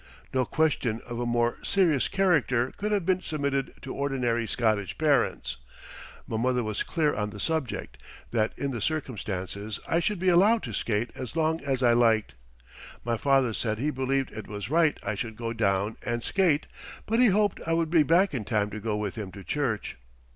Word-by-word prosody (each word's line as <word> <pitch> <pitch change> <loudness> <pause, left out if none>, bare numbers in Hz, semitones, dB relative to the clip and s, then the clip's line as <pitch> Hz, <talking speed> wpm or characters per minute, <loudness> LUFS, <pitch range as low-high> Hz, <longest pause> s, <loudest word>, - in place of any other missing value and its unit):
No 130 -1 +2
question 135 -8 +1
of 120 -1 -5
a 120 - -1
more 120 0 +1
serious 170 -9 +2
character 145 -10 +2
could 210 +1 -2
have 200 -5 +1
been 185 0 +2
submitted 140 -5 -2
to 135 - -5
ordinary 125 -5 0
Scottish 110 -5 0
parents. 150 -3 +1 0.7
My 110 - -2
mother 125 +1 +1
was 110 -1 -2
clear 155 -3 +1
on 105 0 -2
the 105 0 -9
subject, 160 -2 -2 0.3
that 110 -2 0
in 140 -1 -2
the 115 -4 -4
circumstances 105 - -3
I 165 - +2
should 205 +4 0
be 185 +1 +2
allowed 205 +6 +5
to 115 - -5
skate 110 +3 -1
as 130 +1 -7
long 160 -1 +1
as 135 -2 -1
I 120 -1 +5
liked. 115 -2 +3 0.7
My 120 -1 +1
father 135 -1 +2
said 110 0 -1
he 145 +6 0
believed 135 0 -1
it 110 0 -7
was 105 +3 -6
right 160 -1 +3
I - - -1
should 115 -4 -4
go 115 0 -4
down 100 -1 0
and 120 0 -2
skate, 175 -6 +2 0.4
but 225 +2 +1
he 250 - +7
hoped 205 0 +2
I 165 - +2
would 165 -1 +1
be 165 -2 +6
back 170 +6 +3
in 125 -5 -2
time 105 -1 0
to 110 - -5
go 105 0 -2
with 105 -2 -2
him 105 -4 -6
to 100 - -9
church. 125 -7 -2
125 Hz, 195 wpm, -27 LUFS, 110-160 Hz, 0.7 s, he